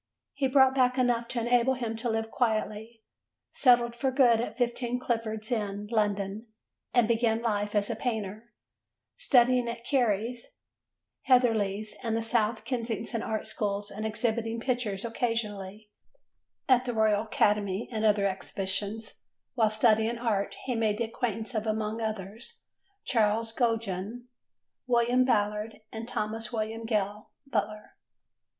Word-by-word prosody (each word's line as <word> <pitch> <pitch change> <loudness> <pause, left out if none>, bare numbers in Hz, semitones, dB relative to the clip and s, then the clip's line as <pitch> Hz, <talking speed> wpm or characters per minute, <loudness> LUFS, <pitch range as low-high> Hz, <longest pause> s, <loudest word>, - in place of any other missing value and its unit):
He 275 -2 0
brought 265 0 +5
back 255 -1 +2
enough 240 -2 +2
to 240 -1 -2
enable 245 +2 +3
him 235 -3 -3
to 235 +1 -2
live 225 0 -2
quietly, 220 -1 -2 0.5
settled 240 -2 +4
for 265 +2 0
good 250 -4 +4
at 225 -1 -5
15 245 0 0
Clifford's 225 -2 -3
Inn, 205 -3 -2
London, 205 0 -1 0.4
and 240 -3 +4
began 230 -1 +2
life 210 -2 -1
as 205 -1 +2
a - - -2
painter, 220 -1 -4 0.6
studying 250 - +4
at 235 0 -7
Cary's, 235 -2 0 0.7
Heatherley's 215 -5 +2
and 225 -2 -1
the - - -1
South 225 0 0
Kensington 230 -2 -3
Art 220 -1 -3
Schools 205 -1 -2
and 210 +2 -6
exhibiting 225 +1 -1
pictures 235 -5 -2
occasionally 215 -3 -3 0.8
at 255 -1 +4
the 245 -2 -2
Royal 215 -2 +3
Academy 210 -2 +1
and 220 -2 -2
other 210 -2 +3
exhibitions: 200 +2 -3 0.3
while 220 -4 +3
studying 220 +1 +3
art 215 -4 -1
he 255 - -1
made 220 -3 +1
the 235 - 0
acquaintance 225 0 -3
of, 220 0 -2
among 215 +1 -1
others, 220 - -5 0.4
Charles 225 0 +1
Gogin, 225 -1 -1 0.6
William 245 +1 +3
Ballard 210 -1 0
and 225 +1 -6
Thomas 220 -1 -3
William 225 0 -3
Gale 210 -1 -1 0.2
Butler. 215 -6 -3
225 Hz, 135 wpm, -28 LUFS, 210-240 Hz, 0.8 s, brought